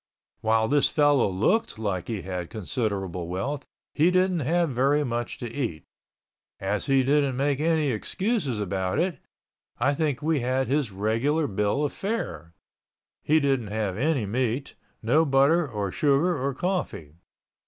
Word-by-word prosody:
While 110 0 +2
this 145 +2 +3
fellow 145 -7 +3
looked 110 - +1
like 100 -5 -3
he 110 -5 -4
had 90 -2 -4
considerable 100 -5 -3
wealth, 130 +11 -3 0.3
he 160 +4 +4
didn't 185 -1 +2
have 165 +2 +1
very 140 +4 +2
much 120 -3 -3
to 120 - -5
eat. 115 - -3 0.8
As 100 +5 -2
he 135 -1 +4
didn't 140 -1 +2
make 140 0 +1
any 155 -2 +2
excuses 145 - -1
about 95 -2 -1
it, 175 -5 0 0.6
I 135 +4 +2
think 145 -2 -1
we 155 -1 +2
had 130 +2 0
his 140 -4 0
regular 115 +11 0
bill 105 +6 0
of 145 - -3
fare. 85 - -4 0.7
He 155 +1 +3
didn't 135 -6 0
have 105 -2 -2
any 135 0 0
meat, 125 +5 -2 0.3
no 145 +9 +4
butter 145 +3 +3
or 105 -4 -3
sugar 150 - +2
or 135 -1 -2
coffee. 175 - -3
130 Hz, 150 wpm, -26 LUFS, 105-150 Hz, 0.8 s, he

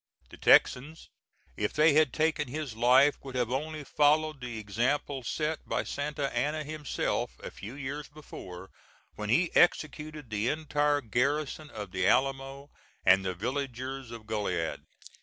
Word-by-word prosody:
The - - -11
Texans, 150 +6 +3 0.5
if 105 - -1
they 155 0 +5
had 155 -3 +4
taken 155 -1 0
his 140 -2 -5
life, 130 +5 +5
would 135 -2 -9
have 125 -1 0
only 155 +3 -3
followed 150 0 +2
the 120 -2 -5
example 125 +7 -1
set 155 +5 -2
by - - 0
Santa 145 -2 -3
Anna 150 +5 0
himself 150 -1 -2
a - - -6
few 110 +6 -9
years 145 +1 -5
before, 95 -11 -10 0.4
when 105 0 -5
he 170 +9 +2
executed 150 -5 +1
the 110 +2 0
entire 150 -1 +1
garrison 140 +6 -1
of 105 -6 -7
the 95 0 0
Alamo 135 +1 0 0.3
and 95 +1 +6
the 95 -1 -2
villagers 130 +3 -4
of 115 -2 -9
Goliad. 105 -1 -2
135 Hz, 145 wpm, -29 LUFS, 120-150 Hz, 0.5 s, and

